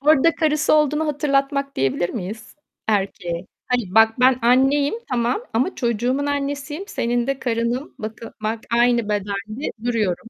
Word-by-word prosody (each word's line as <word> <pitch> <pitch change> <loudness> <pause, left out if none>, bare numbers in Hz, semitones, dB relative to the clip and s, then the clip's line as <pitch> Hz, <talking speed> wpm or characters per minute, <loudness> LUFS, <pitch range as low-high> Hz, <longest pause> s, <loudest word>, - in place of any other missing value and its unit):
Orada 310 +3 +4
karısı 310 -1 +2
olduğunu 300 +1 +2
hatırlatmak 275 -1 0
diyebilir 135 +6 0
miyiz 220 +5 -7 0.3
erkeğe? 185 -4 -1 0.2
Hani, 230 -6 -1
bak 225 +2 +5
ben 255 0 +5
anneyim 270 - +3 0.2
tamam 245 - 0
ama 255 +11 0
çocuğumun 245 +4 0
annesiyim, 285 +4 -3
senin 240 +1 -1
de 275 -1 -1
karınım, 240 +3 -2
bakı 220 +1 -7
bak 220 +1 -2
aynı 235 -2 +3
bedende 205 +5 -3
duruyorum. 220 -5 0
245 Hz, 135 wpm, -22 LUFS, 220-280 Hz, 0.3 s, bak